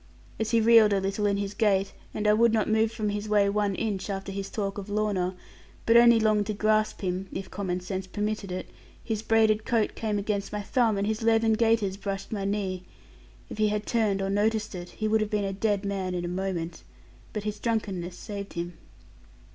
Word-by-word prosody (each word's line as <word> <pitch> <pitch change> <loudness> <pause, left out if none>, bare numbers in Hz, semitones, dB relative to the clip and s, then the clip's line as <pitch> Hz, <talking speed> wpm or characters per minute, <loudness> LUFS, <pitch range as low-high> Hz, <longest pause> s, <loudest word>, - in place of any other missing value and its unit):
As 220 -1 -1
he 230 0 +3
reeled 225 -2 +6
a 195 - +2
little 195 +2 -1
in 200 0 +1
his 200 0 -3
gait, 200 -3 +1 0.2
and 210 0 -2
I 210 - +6
would 230 +1 +4
not 220 -2 +1
move 220 0 +2
from 220 -2 -2
his 205 +1 -3
way 205 -1 +4
one 205 -1 0
inch, 205 -2 -2
after 195 0 -4
his 195 0 -4
talk 200 -1 -3
of 200 +1 -8
Lorna, 205 -3 0 0.5
but 230 - +4
only 235 -1 +7
longed 215 -2 +2
to 215 - -2
grasp 215 +1 +1
him 185 0 -2
(if 190 - -6
common 185 -2 -2
sense 185 0 -4
permitted 210 0 -3
it), 185 - -4 0.4
his 220 -2 -2
braided 220 -1 +3
coat 225 -2 +1
came 215 -2 -2
against 200 0 -2
my 210 -1 -3
thumb, 225 -1 +2
and 200 - 0
his 215 +1 -1
leathern 225 0 +3
gaiters 220 -4 +2
brushed 195 -1 -5
my 200 -3 -2
knee. 195 -2 -2 0.7
If - - -9
he 215 - +4
had 210 0 -1
turned 210 -4 +1
or 195 - -1
noticed 215 +1 0
it, 175 -1 -7
he 215 - -3
would 220 0 +2
have 215 - -1
been 210 -2 0
a 195 - -2
dead 200 0 0
man 190 -2 -2
in 175 0 -2
a - - -2
moment; 175 -2 -3 0.5
but 210 - -4
his 210 0 -4
drunkenness 195 -6 -2
saved 200 -2 -7
him. 170 0 -5
205 Hz, 215 wpm, -27 LUFS, 195-215 Hz, 0.7 s, only